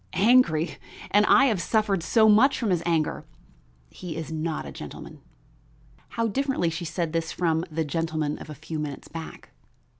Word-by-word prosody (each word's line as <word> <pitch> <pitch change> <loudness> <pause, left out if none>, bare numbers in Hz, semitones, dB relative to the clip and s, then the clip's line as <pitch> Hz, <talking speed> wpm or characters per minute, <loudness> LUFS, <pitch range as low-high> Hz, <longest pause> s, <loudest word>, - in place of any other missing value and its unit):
Angry? 195 -7 +3 0.3
and 210 +1 +4
I 275 - +6
have 215 -9 +1
suffered 210 -2 +1
so 220 +7 +4
much 225 +6 +5
from 225 -6 -1
his 175 -2 +1
anger! 160 -3 0 0.7
He 175 -4 -7
is 160 -1 -6
not 160 0 -3
a - - -7
gentle - - -9
man." - - -12 1.0
How 230 - +1
differently 260 -7 0
she 165 +2 -5
said 165 -1 -3
this 165 -1 -1
from 165 -1 0
the 160 0 -2
gentleman 155 -1 -2
of - - -10
a 150 - -7
few 155 +2 -6
minutes 145 -2 -6
back! 165 -1 -9
165 Hz, 175 wpm, -25 LUFS, 160-210 Hz, 1.0 s, I